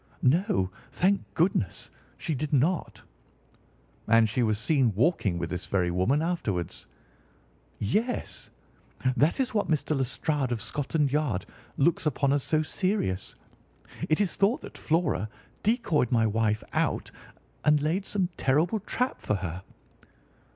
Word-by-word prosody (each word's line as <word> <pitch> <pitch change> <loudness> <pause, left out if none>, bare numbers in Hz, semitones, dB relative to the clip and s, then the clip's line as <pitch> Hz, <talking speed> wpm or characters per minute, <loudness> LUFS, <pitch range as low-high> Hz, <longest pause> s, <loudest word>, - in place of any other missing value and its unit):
"No, 125 - +2 0.2
thank 195 +2 +2
goodness, 165 - 0 0.3
she 160 - -2
did 145 +2 -3
not." 155 +6 +1 1.0
"And 115 0 +5
she 115 +4 -1
was 110 -3 +2
seen 125 -2 +2
walking 105 - +2
with 85 -1 -3
this 90 - -4
very 90 -3 +1
woman 115 - +2
afterwards?" 105 - -2 0.9
"Yes. 215 - -2 0.7
That 150 - +2
is 260 -2 0
what 210 - +1
Mr. 155 -1 0
Lestrade, 135 +1 0
of 120 - -1
Scotland 145 +5 -1
Yard, 140 -11 0 0.3
looks 160 +2 +2
upon 140 -1 +2
as 145 - +2
so 155 +3 +1
serious. 185 - -1 0.7
It 155 - +3
is 205 -4 +1
thought 205 +6 +2
that - - -10
Flora 160 - 0 0.3
decoyed 210 - +1
my 115 -2 +4
wife 110 0 +1
out - - 0 0.5
and 150 0 +5
laid 165 +7 -1
some 190 -4 0
terrible 160 +10 +2
trap 250 +5 -2
for 105 - 0
her." 90 -2 -4
145 Hz, 135 wpm, -28 LUFS, 110-170 Hz, 1.0 s, And